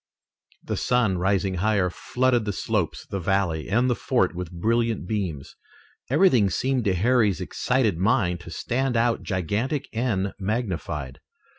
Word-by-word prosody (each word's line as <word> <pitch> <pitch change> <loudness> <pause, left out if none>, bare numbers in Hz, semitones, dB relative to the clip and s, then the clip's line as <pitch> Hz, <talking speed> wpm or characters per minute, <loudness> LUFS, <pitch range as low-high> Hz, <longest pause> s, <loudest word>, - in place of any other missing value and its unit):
The - - -3
sun, 115 -7 +1
rising 95 +1 +1
higher, 100 -3 +2
flooded 125 +2 0
the 105 - -2
slopes, 100 -4 -2
the 100 - -4
valley, 90 -4 0
and 120 +5 +2
the 125 - +3
fort 120 -6 +1
with 90 -1 -6
brilliant 115 +3 0
beams. 90 -10 -3 0.5
Everything 130 - +4
seemed 130 +2 0
to 95 -2 +2
Harry's 110 -1 +2
excited 125 -9 0
mind 95 -3 +2
to 90 - -11
stand 125 +7 -1
out 115 0 +2
gigantic 110 - -2
and 110 -5 -1
magnified. 90 - -3
105 Hz, 140 wpm, -25 LUFS, 90-120 Hz, 0.5 s, Everything